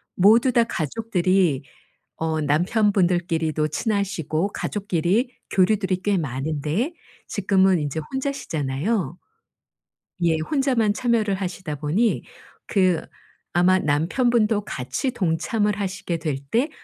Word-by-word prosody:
모두 225 +7 +5
다 235 - +5
가족들이 185 - 0 0.5
어 160 -1 -1
남편분들끼리도 175 -2 +1
친하시고 195 - -1
가족끼리 205 - -1 0.2
교류들이 190 0 +2
꽤 205 -1 +2
많은데 155 - -2 0.3
지금은 190 -2 +2
이제 150 +1 -2
혼자시잖아요. 185 - -2 1.1
예. 165 -2 +3
혼자만 250 - +1
참여를 225 -3 +1
하시다 185 -4 -4
보니 165 +11 0 0.4
그 185 -5 +2 0.5
아마 180 +2 +4
남편분도 210 - +1
같이 130 - -3
동참을 210 +1 0
하시게 190 -3 -3
될 155 -4 -2
때 255 +7 +2
185 Hz, 255 characters per minute, -23 LUFS, 160-215 Hz, 1.1 s, 모두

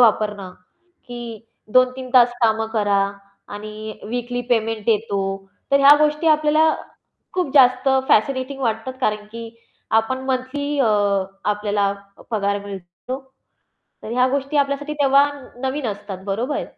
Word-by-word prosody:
वापरणं, 210 -4 +2 0.6
की 235 -2 -8 0.3
2-3 255 0 +2
तास 245 -1 +6
कामं 220 0 +2
करा 205 -3 +2 0.5
आणि 215 +1 -8
वीकली 245 +1 -3
पेमेंट 225 -2 0
येतो. 210 -2 +1 0.5
तर 275 - +5
ह्या 280 +1 +8
गोष्टी 300 +1 +1
आपल्याला 310 +1 +4 0.6
खूप 360 -6 -1
जास्त 255 -1 +5 0.2
फॅसिनेटिंग 265 +4 +1
वाटतात 225 +2 -1
कारण 210 -4 0
की 230 0 -7 0.5
आपण 260 +4 -4
मंथली 275 +3 -2
अ, 265 - +3 0.6
आपल्याला 205 -1 0 0.4
पगार 200 -2 0
मिळतो 195 -3 -8 1.2
तर - - -7
ह्या 250 +1 +3
गोष्टी 280 +2 -1
आपल्यासाठी 285 +1 0
तेव्हा 280 0 +4 0.3
नवीन 265 +1 -2
असतात, 205 -2 -6
बरोबर? 235 +9 -2
245 Hz, 120 wpm, -21 LUFS, 215-275 Hz, 1.2 s, ह्या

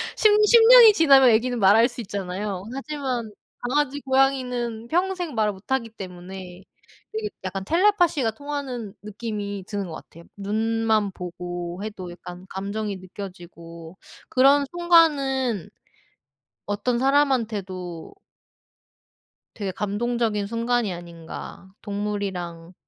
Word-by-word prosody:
10- 435 - +5 0.2
10 470 +2 +7
년이 480 -3 +10
지나면 275 -8 +6
애기는 240 +2 +2
말 195 0 +6
할 230 +2 +6
수 240 -1 -8
있잖아요. 195 -1 -4
하지만 270 -5 -4 0.3
강아지, 285 +3 0
고양이는 250 -4 0
평생 355 -1 -1
말을 215 -3 +1
못 190 +6 -15
하기 255 -4 0
때문에 185 -2 -9 0.5
되게 435 -1 -3
약간 190 +1 -4
텔레파시가 345 - +2
통하는 260 -5 -5
느낌이 205 -2 -5
드는 200 -3 -3
것 160 - -7
같아요. 170 +1 -13
눈만 220 0 0
보고 175 +1 -6
해도 200 -5 -6
약간 180 +1 -10
감정이 200 +1 -4
느껴지고 175 -3 -10 0.3
그런 275 +2 +5
순간은 280 - +2 1.0
어떤 235 +4 -1
사람한테도 220 - 0 1.4
되게 200 -3 -4
감동적인 210 +1 -1
순간이 230 -2 0
아닌가, 170 +2 -10
동물이랑 195 -5 -4
220 Hz, 260 characters per minute, -24 LUFS, 190-265 Hz, 1.4 s, 년이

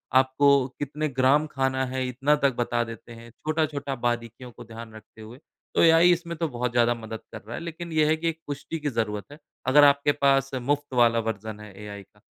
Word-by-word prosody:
आपको 135 +1 +4
कितने 150 +2 -2
ग्राम 135 +3 +3
खाना 130 -2 -1
है, 130 0 -3
इतना 135 +4 +1
तक 140 -2 +1
बता 120 0 0
देते 115 +1 -10
हैं। 115 0 -12
छोटा-छोटा 150 0 -2
बारीकियों 120 0 -3
को 120 - -12
ध्यान 115 -1 -10
रखते 110 0 -15
हुए। 115 +4 -11 0.4
तो - - +4
एआई 165 +1 +6
इसमें 170 -1 -1
तो 165 - -1
बहुत 125 -1 -2
ज़्यादा 120 0 +3
मदद 110 -1 -7
कर - - -8
रहा 120 - -6
है, - - -6
लेकिन 170 0 -7
ये 155 -1 +3
है 155 - +3
कि 165 +1 -1
एक 165 0 -6
पुष्टि 145 +3 -5
की 150 -1 -2
ज़रूरत 105 -4 -2
है, 145 - -11 0.3
अगर 145 +3 +6
आपके 140 0 +5
पास 135 -1 +3
मुफ्त 145 +2 -2
वाला 120 -2 +4
वर्ज़न 110 -1 -4
है 105 -1 -11
एआई 100 -1 -8
का। 105 +2 -29
130 Hz, 215 wpm, -25 LUFS, 115-145 Hz, 0.4 s, एआई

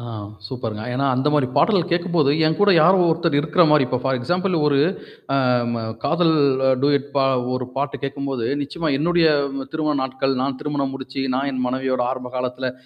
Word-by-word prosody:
ஆ - - -9 0.4
சூப்பர்ங்க. 110 -3 -5
ஏன்னா, 140 +3 0
அந்த 130 +4 0
மாரி 145 -3 +2
பாடல்கள் 185 -5 +2
கேட்கும்போது, 170 -4 +1 0.2
என் 155 0 +1
கூட 205 - +5
யாரோ 185 +4 +5
ஒருத்தர் 165 -2 +1
இருக்கிற 155 +4 +2
மாரி 150 -2 +5
இப்ப 125 0 -1
ஃபார் 135 -1 0
எக்ஸாம்பிள் 180 +8 -1
ஒரு 140 -2 +2 0.6
அ - - +3 0.4
ம 115 -1 -3 0.2
காதல் 165 -1 +2 0.5
டூயட் 140 -1 +1
பா 135 - +3 0.3
ஒரு 125 0 -2
பாட்டு 140 +1 -2
கேட்கும்போது, 135 -3 -3 0.2
நிச்சயமா 160 +3 -4
என்னுடைய 170 +2 +2 0.5
திருமண 155 -1 -1
நாட்கள், 130 +1 -1
நான் 135 0 -1
திருமணம் 145 -2 -2
முடிச்சு 135 0 -6
நான் 135 +2 -1
என் 130 -1 -3
மனைவியோட 130 0 -1
ஆரம்ப 125 -1 -7
காலத்தில 125 0 -3
140 Hz, 175 wpm, -21 LUFS, 130-160 Hz, 0.6 s, கூட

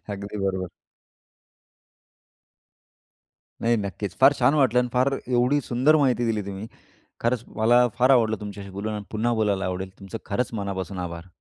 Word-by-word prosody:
अगदी 100 +1 -7
बरोबर. 95 -2 -2 2.9
नाही, 115 +1 +3
नक्कीच. 100 -1 -4
फार 140 +2 +8
छान - - +4
वाटलं. 130 -5 +4
अन् 125 0 0
फार 130 +2 +2
एवढी 125 +3 +2
सुंदर 130 +6 +3
माहिती 125 -3 +2
दिली 110 -2 0
तुम्ही. 100 +3 -6 0.5
खरंच 120 0 0
मला 120 +2 +5
फार 125 +2 +4
आवडलं 110 -4 +3
तुमच्याशी 100 -1 -8
बोलून 100 +3 -4
आणि 105 -1 -5
पुन्हा 115 +2 0
बोलायला 105 -3 0
आवडेल. 95 +1 -3
तुमचं 100 +3 -7
खरंच 115 +4 -1
मनापासून 95 -1 -4
आभार. 85 +1 -9
110 Hz, 145 wpm, -24 LUFS, 100-125 Hz, 2.9 s, फार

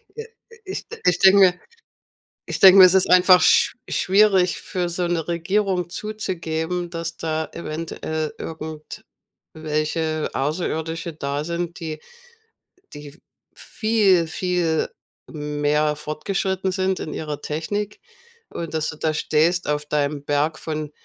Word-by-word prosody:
I 450 0 -7 0.4
i 380 - -5 0.3
ich 180 - 0
denke 190 -2 +6 0.9
ich - - -4
denke 190 0 +8
mir, 185 - +11
es 185 +1 +6
ist 190 - +3
einfach 180 0 +7
schw - - +4
schwierig 190 -2 +3
für 180 -3 -3
so 175 +1 -2
'ne 170 -2 -1
Regierung 180 +1 -1
zuzugeben, 175 -5 -4
dass 170 -1 -5
da 160 -1 -3
eventuell 160 -1 -4
irgendwelche 155 0 -5
Außerirdische 160 +3 -2
da 145 0 -3
sind, 170 +1 -4
die 155 -2 -5 0.9
die 145 +2 -11 0.4
viel, 210 -7 +1
viel 175 -2 -1 0.4
mehr 150 0 0
fortgeschritten 190 +5 -2
sind 190 0 -1
in 155 - -5
ihrer 150 -2 -5
Technik 205 +7 -4 0.5
und 165 -2 -6
dass 155 -1 -1
du 150 - -7
da 155 -1 -1
stehst 165 +4 +1
auf 150 0 -1
deinem 145 -1 -1
Berg 145 +2 0
von 155 -1 -5
165 Hz, 125 wpm, -22 LUFS, 155-185 Hz, 0.9 s, mir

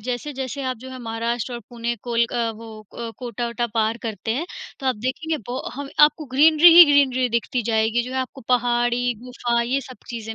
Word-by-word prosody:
जैसे-जैसे 260 +3 -4
आप 255 - -4
जो 260 +3 -10
है 260 - -8
महाराष्ट्र 230 +2 -3
और 235 - -6
पुणे 235 0 -3
कोलक 235 -1 0 0.2
वो 230 +1 -11 0.3
अ, 230 -1 -4
कोटा-वोटा 240 -1 -3
पार 225 +1 +1
करते 220 -2 -4
हैं, 325 +7 -3 0.3
तो 270 - -4
आप 255 - +1
देखेंगे 285 +8 -2
बो 250 +2 -4 0.2
हव 285 0 -5 0.2
आपको 305 0 -1
ग्रीनरी 315 +3 +7
ही 350 - +12
ग्रीनरी 260 -3 +3
दिखती 235 +1 -1
जाएगी 220 +2 +1
जो 250 +2 -7
है 260 - -2
आपको 260 +1 -7
पहाड़ी, 240 0 +1
गुफा 240 -1 -1
ये 255 +4 -1
सब 255 -1 -11
चीज़ें 225 -1 -6
245 Hz, 190 wpm, -22 LUFS, 235-260 Hz, 0.3 s, ही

